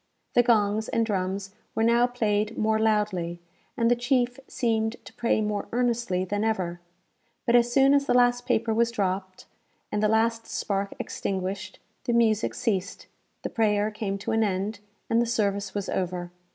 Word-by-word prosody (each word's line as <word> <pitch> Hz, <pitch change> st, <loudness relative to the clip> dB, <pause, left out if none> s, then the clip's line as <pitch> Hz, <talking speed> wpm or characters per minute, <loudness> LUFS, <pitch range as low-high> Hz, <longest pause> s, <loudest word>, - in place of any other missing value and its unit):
The 245 Hz, -, +6 dB
gongs 215 Hz, -3 st, +2 dB
and 230 Hz, 0 st, +1 dB
drums 195 Hz, -1 st, -2 dB, 0.2 s
were 225 Hz, -, +1 dB
now 235 Hz, +1 st, +4 dB
played 215 Hz, -2 st, -1 dB
more 220 Hz, 0 st, +2 dB
loudly, 205 Hz, -6 st, 0 dB, 0.4 s
and 230 Hz, -1 st, +3 dB
the -, -, +5 dB
chief 245 Hz, 0 st, 0 dB
seemed 225 Hz, -2 st, 0 dB
to -, -, -12 dB
pray 235 Hz, -2 st, +1 dB
more 210 Hz, -1 st, -2 dB
earnestly 235 Hz, -6 st, 0 dB
than 205 Hz, +3 st, -1 dB
ever; 185 Hz, -6 st, -1 dB, 0.6 s
but 235 Hz, -, +3 dB
as 240 Hz, 0 st, +4 dB
soon 270 Hz, +2 st, +5 dB
as 280 Hz, 0 st, +3 dB
the -, -, +3 dB
last 245 Hz, 0 st, +3 dB
paper 225 Hz, 0 st, +1 dB
was 230 Hz, +1 st, +2 dB
dropped, 190 Hz, -3 st, -3 dB, 0.5 s
and 210 Hz, -, 0 dB
the 215 Hz, -, +4 dB
last 225 Hz, +1 st, +1 dB
spark 200 Hz, -1 st, -2 dB
extinguished, 190 Hz, 0 st, -4 dB, 0.3 s
the 240 Hz, -, 0 dB
music 225 Hz, -2 st, +2 dB
ceased, 200 Hz, -3 st, -2 dB, 0.4 s
the -, -, -2 dB
prayer 210 Hz, -1 st, +1 dB
came 210 Hz, -2 st, -3 dB
to 200 Hz, -, -4 dB
an 225 Hz, 0 st, +2 dB
end, 200 Hz, +1 st, -1 dB, 0.3 s
and 230 Hz, +1 st, +3 dB
the 235 Hz, -, 0 dB
service 205 Hz, -4 st, -1 dB
was 200 Hz, -2 st, -2 dB
over. 180 Hz, -1 st, -2 dB
220 Hz, 170 wpm, -26 LUFS, 200-235 Hz, 0.6 s, The